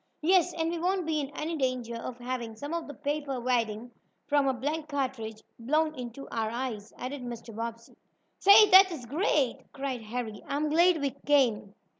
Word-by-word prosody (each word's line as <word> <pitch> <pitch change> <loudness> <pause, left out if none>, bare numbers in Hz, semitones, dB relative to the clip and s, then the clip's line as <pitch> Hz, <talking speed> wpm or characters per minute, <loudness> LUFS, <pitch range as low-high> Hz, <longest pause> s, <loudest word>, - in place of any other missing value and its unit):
"Yes, 360 +1 +4
and 325 0 -1
we 340 - -3
won't 365 +1 0
be 315 -1 0
in 280 -2 -3
any 325 +2 -2
danger 255 -4 -2
of 235 +1 -6
having 240 -2 -5
some 285 +8 -6
of 335 -1 -3
the 290 - -7
paper 290 -2 -3
wadding 235 -2 -1 0.3
from 290 -1 +2
a 265 - +2
blank 300 +5 -3
cartridge 255 -7 -3 0.2
blown 305 +6 +1
into 250 0 -8
our 225 -1 -1
eyes," 230 -3 -4
added 260 +2 -5
Mr. 235 -2 -8
Bobbsey. 230 0 -6 0.4
"Say, 415 +2 +8
this 380 +1 +9
is 305 -9 -7
great!" 285 - +1 0.2
cried 270 -3 -4
Harry. 220 -1 -5
"I'm 295 +2 -1
glad 340 +1 +4
we 280 -1 -1 0.2
came." 235 -8 +2
270 Hz, 180 wpm, -29 LUFS, 235-310 Hz, 0.4 s, this